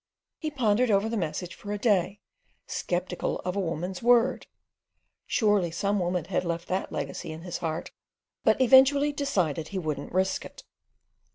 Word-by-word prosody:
He 310 - -2
pondered 245 -4 +2
over 200 +1 +3
the 230 - -2
message 175 -1 -3
for 205 - -8
a 210 - -1
day, 200 -2 +1 0.4
sceptical 180 0 -2
of 180 +1 -3
a - - 0
woman's 180 +1 -3
word—surely 230 -4 0
some 200 +5 0
woman 180 -2 -1
had 190 - -1
left 170 -1 -3
that 185 +1 -2
legacy 140 +2 -4
in 160 +1 -8
his 180 -2 -5
heart—but 165 +8 -3
eventually 270 +3 +6
decided 180 - -1
he 195 - -5
wouldn't 155 -5 -3
risk 190 +1 0
it. - - -12
190 Hz, 150 wpm, -27 LUFS, 175-230 Hz, 0.4 s, eventually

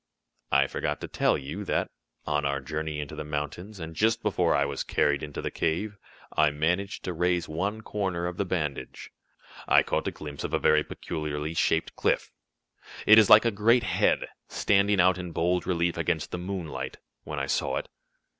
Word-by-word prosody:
"I 70 +1 +5
forgot 75 +2 -3
to - - -4
tell - - +2
you 75 +9 -6
that, - - -1 0.3
on 75 -1 0
our 70 0 0
journey 75 +2 -4
into 75 -1 -5
the - - -5
mountains, 75 +7 -5
and 80 0 -7
just 115 +5 +2
before 90 - +2
I 70 +1 +3
was 70 -1 -3
carried 70 -1 +1
into 75 -1 -6
the - - -2
cave, 100 +6 -1 0.4
I 75 -1 +5
managed 85 +7 -1
to 90 - -3
raise 90 0 +1
one 100 +8 -2
corner 95 -5 -2
of 90 0 -4
the - - +1
bandage. 80 -6 -4 0.6
I - - +6
caught - - -1
a - - 0
glimpse 75 -2 -8
of - - -1
a - - +3
very 75 0 +3
peculiarly 75 0 -4
shaped 80 0 +1
cliff - - 0 0.7
it 110 +1 +9
is 110 - +5
like 105 +2 +9
a 115 - +3
great 115 +4 +3
head, - - +1 0.2
standing 100 0 +2
out 90 +1 +4
in 90 -2 -6
bold 90 +2 0
relief 85 -1 0
against 80 -1 -1
the 90 - -3
moonlight, 85 -8 -5 0.3
when 75 - -6
I 70 - -1
saw 65 - 0
it. - - -4
85 Hz, 190 wpm, -27 LUFS, 75-95 Hz, 0.7 s, it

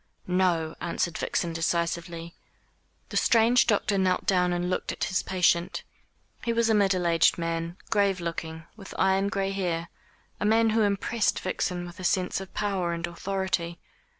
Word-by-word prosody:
"No," 180 -3 +1
answered 170 -1 -2
Vixen 170 -2 -1
decisively. 170 0 -2 0.8
The - - -2
strange 235 +1 +4
doctor 205 -2 +2
knelt 185 -1 +1
down 180 -2 +2
and 175 0 -1
looked 185 - -1
at - - -4
his 180 - 0
patient. 180 -1 +1 0.6
He 235 - 0
was 230 -1 +2
a - - +4
middle 195 -4 +2
aged 165 -1 +4
man, 165 +1 -3
grave 200 -3 +2
looking, 165 -1 -5
with 200 -3 -11
iron 190 +1 +2
gray 195 -2 -1
hair 175 -3 -2 0.5
a - - -2
man 225 +1 +4
who 225 +1 +2
impressed 205 -1 +1
Vixen 180 -1 -2
with 175 +1 -11
a - - -7
sense 180 +1 0
of 190 - -9
power 190 -4 -1
and 170 0 -2
authority. 175 -1 -2
180 Hz, 160 wpm, -27 LUFS, 170-195 Hz, 0.8 s, strange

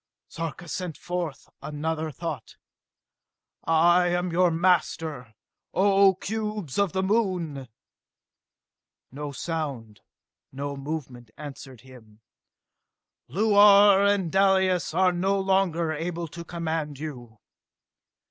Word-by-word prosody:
Sarka 165 +2 -6
sent 175 0 -5
forth 175 -5 -5
another 155 +2 -3
thought. 145 - -6 1.1
"I 175 +2 +4
am 175 0 -1
your 180 +1 +3
master, 160 -7 0 0.4
O 195 0 +4
cubes 210 -6 -4
of 200 -4 +2
the 190 - 0
Moon!" 185 - -1 1.4
No 145 +2 -6
sound, 135 - -5 0.5
no 140 +1 -5
movement, 135 -5 -6
answered 135 -4 -10
him. 115 -5 -17 1.1
"Luar 205 -1 +6
and 200 -4 +1
Dalis 190 -3 +2
are 185 0 +4
no 190 +3 0
longer 190 -4 +1
able 165 +2 -4
to 170 +3 -8
command 160 -4 -4
you!" 125 -7 -8
170 Hz, 100 wpm, -26 LUFS, 145-190 Hz, 1.4 s, Luar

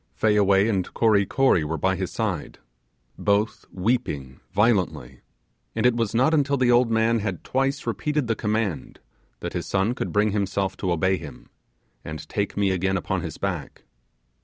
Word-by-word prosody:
Fayaway 100 - +3
and 95 -5 -1
Kory 105 -4 +3
Kory 130 -11 +3
were 80 +2 -2
by 95 +4 +1
his 95 -1 -3
side, 100 -9 -3 0.6
both 105 +2 0
weeping 90 - -2
violently; 95 - +1 0.6
and - - 0
it 125 -1 +4
was 115 -2 -1
not 130 +7 +3
until 140 -2 +2
the 125 -2 +3
old 120 0 +4
man 115 +1 +2
had 100 -4 -4
twice 135 +2 -1
repeated 150 -2 -1
the 115 - +1
command 105 - -2 0.4
that - - -4
his - - -3
son 95 +5 +1
could - - -4
bring 105 0 +2
himself 100 -1 -1
to 95 - -1
obey 95 +3 +2
him, 75 -5 -11 0.5
and 75 -1 -7
take 100 -1 -2
me 100 -1 +2
again 95 +1 0
upon 90 - -2
his - - -6
back. - - -4
100 Hz, 165 wpm, -24 LUFS, 95-115 Hz, 0.6 s, it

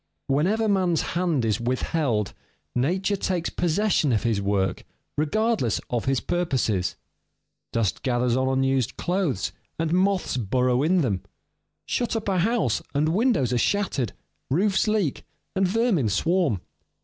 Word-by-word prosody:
Whenever 190 +11 +1
man's 185 -5 +2
hand 170 -8 +1
is 110 +1 0
withheld, 125 - 0 0.4
nature 185 +11 +1
takes 180 -3 -1
possession 175 -3 +1
of 110 - +1
his 115 -4 +1
work, 95 -2 0 0.3
regardless 200 - +1
of 120 -2 -1
his 135 -1 +2
purposes. 130 - 0 0.8
Dust 115 -4 0
gathers 125 -2 +1
on 130 0 +1
unused 135 -2 +1
clothes, 175 - -1 0.3
and 165 0 -1
moths 185 -5 +1
burrow 125 +3 +1
in 175 +4 +3
them. 105 - 0 0.6
Shut 240 -1 -1
up 220 -2 -3
a 190 -2 +1
house, 205 - +1
and 150 +2 +2
windows 195 - +2
are 120 - +2
shattered, 150 - 0 0.4
roofs 190 +9 +2
leak, 210 -9 0 0.3
and 190 0 +3
vermin 200 - +2
swarm. 160 - +1
150 Hz, 135 wpm, -25 LUFS, 120-190 Hz, 0.8 s, in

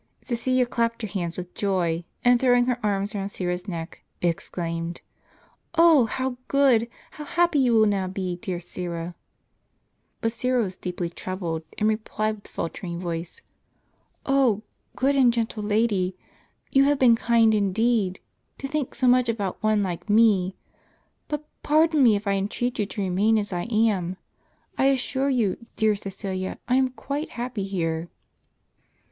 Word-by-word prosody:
Ciecilia 255 +1 +1
clapped 230 -1 -1
her - - -1
hands 175 -4 -3
with 180 0 -7
joy, 175 -4 0 0.2
and 245 0 +6
throwing 245 -1 +4
her 250 -1 0
arms 200 0 0
round 200 -1 -3
Syra's 180 0 -3
neck, 165 -3 -6 0.2
exclaimed: 170 0 -3 0.4
" - - -25
Oh, 325 -8 +6
how 260 +2 -2
good! 260 -5 +3 0.2
How 300 - -8
happy 340 0 +2
you 245 -3 +3
will 220 - +6
now 200 -3 +1
be, 185 -1 -3
dear 180 0 -4
Syra! 175 -1 -5 0.6
" - - -47
But 225 - +1
Syra 250 +1 +1
was 185 -3 -4
deeply 180 -2 -4
troubled, 175 -3 -4 0.2
and 215 - +2
replied 215 0 -1
with 200 - -17
faltering 170 +1 -5
voice, 175 - -5 0.4
" - - -43
0 260 -6 +3 0.3
good 275 +2 +2
and 260 -3 +5
gentle 230 -2 -2
lady, 205 -3 +1 0.6
you 270 0 +5
have 290 0 +3
been 245 -3 +6
kind 230 -1 +3
indeed, 205 -1 +1 0.4
to 275 - -5
think 295 -2 -3
so 255 - +1
much 250 -1 +4
about 205 -5 -2
one 215 -1 +2
like 180 +2 -4
me. 205 -4 +4 0.7
But 300 0 -4 0.2
pardon 310 0 +3
me 235 -5 +6
if 205 +1 -3
I 200 - +1
entreat 210 +5 -2
you 205 - +1
to 210 - -5
remain 200 +4 +2
as 205 -2 -2
I 175 0 -2
am; 215 -6 +1 0.6
I 265 - +4
assure 270 0 +1
you, 230 -5 0
dear 220 -1 +3
Csecilia, 195 -1 -5
I 250 +1 +3
am 260 -1 +3
quite 280 +4 -4
happy 235 -4 -3
here." 170 -3 -2
215 Hz, 160 wpm, -25 LUFS, 185-245 Hz, 0.7 s, and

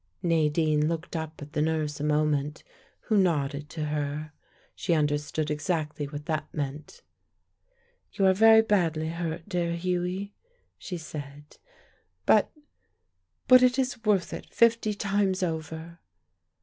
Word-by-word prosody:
Nadine 155 -2 +2
looked 165 +1 -4
up 160 -1 -5
at 145 - -12
the 150 - 0
nurse 155 -1 -1
a - - -3
moment, 150 0 0 0.4
who 220 - -1
nodded 145 -5 0
to 155 -1 -4
her. 150 0 -3 0.4
She 170 - 0
understood 150 0 0
exactly 150 -1 -2
what 145 +1 -7
that 155 -2 -3
meant. 145 0 -6 1.1
"You 195 - +1
are 190 - +6
very 220 +2 +7
badly 165 -7 +1
hurt, 165 0 -4
dear 175 -3 -1
Hughie," 180 +3 -2 0.5
she 180 - -5
said; 145 -2 -9 0.7
"But 215 - +4 1.0
but 255 0 +8
it 250 0 +4
is 255 -3 -1
worth 200 -5 +1
it - - -8
fifty 230 -2 +3
times 195 -2 0
over." 160 0 -4
160 Hz, 130 wpm, -27 LUFS, 150-185 Hz, 1.1 s, but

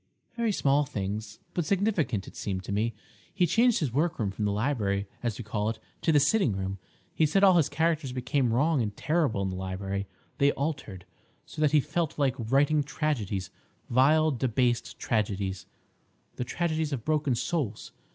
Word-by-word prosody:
"Very 235 -2 +1
small 145 -6 +2
things, 105 -2 -4 0.2
but 175 - 0
significant 180 - 0
it - - -11
seemed 95 -2 -3
to - - -6
me. 110 +2 0 0.4
He 180 - +2
changed 235 +4 +3
his 135 -7 -1
workroom 145 - 0
from 105 +2 -3
the 100 - +1
library, 105 -3 0 0.2
as 115 -4 -2
we 120 - -6
call 105 0 -1
it, 115 - -3 0.2
to 165 - +2
the 150 - +5
sitting 150 - +3
room. 95 0 -3 0.3
He 155 - +3
said 195 +7 +2
all 190 -2 +7
his 155 -4 +3
characters 160 -3 0
became 125 0 0
wrong 145 +4 +2
and 105 -2 -3
terrible 150 -11 +1
in 95 - -1
the - - -5
library; 95 +1 -3 0.3
they 140 0 +4
altered, 135 - -4 0.4
so - - -7
that 150 -2 +4
he 150 -1 +5
felt 150 +2 -2
like 140 -4 +2
writing 140 +6 +3
tragedies—vile, 140 - 0
debased 125 -1 0
tragedies, 100 -3 -1 0.7
the - - -2
tragedies 160 +3 -1
of 125 -5 -4
broken 150 -4 +1
souls. 120 -5 -2
130 Hz, 170 wpm, -28 LUFS, 105-155 Hz, 0.7 s, all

